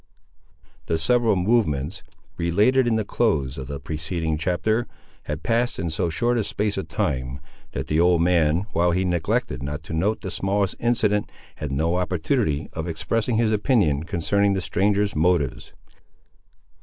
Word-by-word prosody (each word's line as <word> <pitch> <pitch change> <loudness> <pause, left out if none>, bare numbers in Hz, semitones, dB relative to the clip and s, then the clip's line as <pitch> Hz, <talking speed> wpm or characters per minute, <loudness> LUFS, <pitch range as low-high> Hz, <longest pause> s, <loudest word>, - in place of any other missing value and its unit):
The 80 - +1
several 115 +5 +3
movements, 90 - +1 0.3
related 105 +10 +3
in 115 - +2
the 110 -2 0
close 75 - 0
of 65 - -6
the 70 0 -5
preceding 80 +1 -3
chapter, 95 +8 0 0.4
had 75 +3 -4
passed 120 +1 +1
in 80 0 -2
so 85 +2 0
short 120 +8 +1
a - - +1
space 105 0 -1
of 95 -4 -4
time, 65 -2 -2 0.3
that 65 - -3
the 75 +5 0
old 90 0 +4
man, 85 0 +2
while 85 +1 +3
he 95 +2 +1
neglected 85 -7 -1
not 75 +3 -5
to 80 - -7
note 100 +7 0
the 95 - -5
smallest 100 +1 0
incident, 105 -3 +1 0.3
had 75 -3 -4
no 80 +5 +1
opportunity 90 - 0
of 80 +1 -4
expressing 110 +8 -1
his 110 -1 +2
opinion 105 - +2
concerning 100 +4 +1
the 95 - 0
stranger's 100 +5 +1
motives. 75 -7 +1
90 Hz, 155 wpm, -24 LUFS, 80-105 Hz, 0.4 s, old